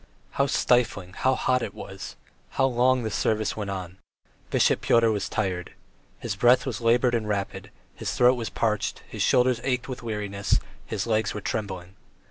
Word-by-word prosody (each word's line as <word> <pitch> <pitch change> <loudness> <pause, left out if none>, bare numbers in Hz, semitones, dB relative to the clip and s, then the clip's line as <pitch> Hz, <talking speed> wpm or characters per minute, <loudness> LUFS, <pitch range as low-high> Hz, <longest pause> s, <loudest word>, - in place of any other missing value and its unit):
How 140 - +1
stifling, 110 -9 +1
how 130 +5 +1
hot 125 0 +1
it 100 - -5
was! 95 0 -8 0.4
How 135 - +4
long 130 0 +2
the 110 - -2
service 110 0 0
went 105 -2 -4
on! 95 -1 -6 0.5
Bishop - - +3
Pyotr 115 -1 +4
was 105 -2 -2
tired. 90 -4 -2 0.4
His - - -4
breathing 120 +5 +5
was 120 -5 -4
laboured 120 +2 +3
and 115 -2 0
rapid, 100 -1 -3 0.2
his - - -4
throat 125 +1 +6
was 120 -3 -3
parched, 105 -3 -1
his - - -6
shoulders 125 -1 +3
ached 125 -1 -1
with 130 -2 -6
weariness, 105 -3 -1 0.3
his 100 - -2
legs 110 -2 0
were 105 - -4
trembling. 95 -3 -4
110 Hz, 170 wpm, -26 LUFS, 100-125 Hz, 0.5 s, throat